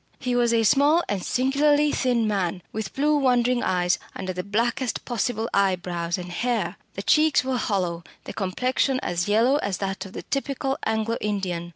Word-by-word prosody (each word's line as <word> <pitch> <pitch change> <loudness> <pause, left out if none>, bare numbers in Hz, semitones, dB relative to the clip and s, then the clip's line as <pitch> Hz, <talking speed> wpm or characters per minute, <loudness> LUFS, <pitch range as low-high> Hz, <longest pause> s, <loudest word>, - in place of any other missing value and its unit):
He 250 -2 -2
was 240 -1 +3
a 230 -1 +3
small 285 +10 +4
and 195 -3 -2
singularly 290 +5 +2
thin 240 -4 +1
man, 185 -4 -1
with 220 -1 -5
blue 300 +2 +2
wandering 250 -2 +2
eyes 180 -1 +1 0.2
under 185 -1 -4
the 180 - -3
blackest 235 +5 -1
possible 230 -2 -1
eyebrows 180 -3 0
and 180 -1 -7
hair. 235 +6 -1 0.2
The - - -5
cheeks 310 -3 +4
were 260 -1 -1
hollow, 180 -6 -1 0.2
the - - -8
complexion 255 +7 0
as 175 +1 -1
yellow 230 +7 +3
as 200 -9 -2
that 195 -1 -3
of 185 - -14
the - - -6
typical 275 -1 -2
Anglo 220 +1 0
Indian. 185 -5 -2
225 Hz, 175 wpm, -24 LUFS, 185-260 Hz, 0.2 s, small